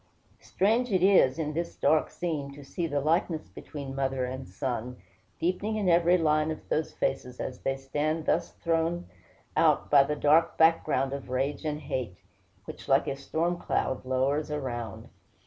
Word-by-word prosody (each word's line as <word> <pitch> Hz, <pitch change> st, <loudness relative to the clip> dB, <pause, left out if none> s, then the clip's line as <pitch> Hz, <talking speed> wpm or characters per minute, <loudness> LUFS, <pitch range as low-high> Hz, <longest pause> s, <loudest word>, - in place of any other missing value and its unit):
Strange 230 Hz, +5 st, +1 dB
it 185 Hz, -2 st, +2 dB
is, 185 Hz, -9 st, +5 dB
in 155 Hz, -2 st, -2 dB
this 170 Hz, +2 st, -3 dB
dark 155 Hz, -, +2 dB
scene, 155 Hz, -6 st, -3 dB
to 145 Hz, -, -11 dB
see 165 Hz, +5 st, -3 dB
the 145 Hz, -2 st, -1 dB
likeness 160 Hz, +2 st, 0 dB
between 140 Hz, -3 st, -8 dB
mother 135 Hz, -1 st, -1 dB
and 130 Hz, -3 st, -6 dB
son, 125 Hz, +3 st, -4 dB, 0.4 s
deepening 185 Hz, +5 st, -1 dB
in 210 Hz, -3 st, -1 dB
every 175 Hz, +1 st, +5 dB
line 155 Hz, -2 st, +2 dB
of 160 Hz, -, -6 dB
those 155 Hz, -, 0 dB
faces, 125 Hz, -2 st, -3 dB
as 125 Hz, -, -5 dB
they 135 Hz, 0 st, -1 dB
stand 150 Hz, +4 st, -2 dB
thus 170 Hz, +1 st, +1 dB
thrown 165 Hz, +1 st, -1 dB, 0.5 s
out -, -, +3 dB
by 145 Hz, -1 st, +8 dB
the 150 Hz, +2 st, 0 dB
dark 155 Hz, +3 st, +3 dB
background 155 Hz, -4 st, +3 dB
of 140 Hz, -2 st, -6 dB
rage 135 Hz, +4 st, -1 dB
and 150 Hz, 0 st, -2 dB
hate, 120 Hz, -10 st, -4 dB, 0.5 s
which -, -, -9 dB
like 135 Hz, -1 st, +4 dB
a 135 Hz, -, -1 dB
storm 165 Hz, +5 st, -2 dB
cloud 130 Hz, -, -1 dB
lowers 130 Hz, +4 st, 0 dB
around. 120 Hz, -8 st, -4 dB
150 Hz, 165 wpm, -28 LUFS, 135-165 Hz, 0.5 s, by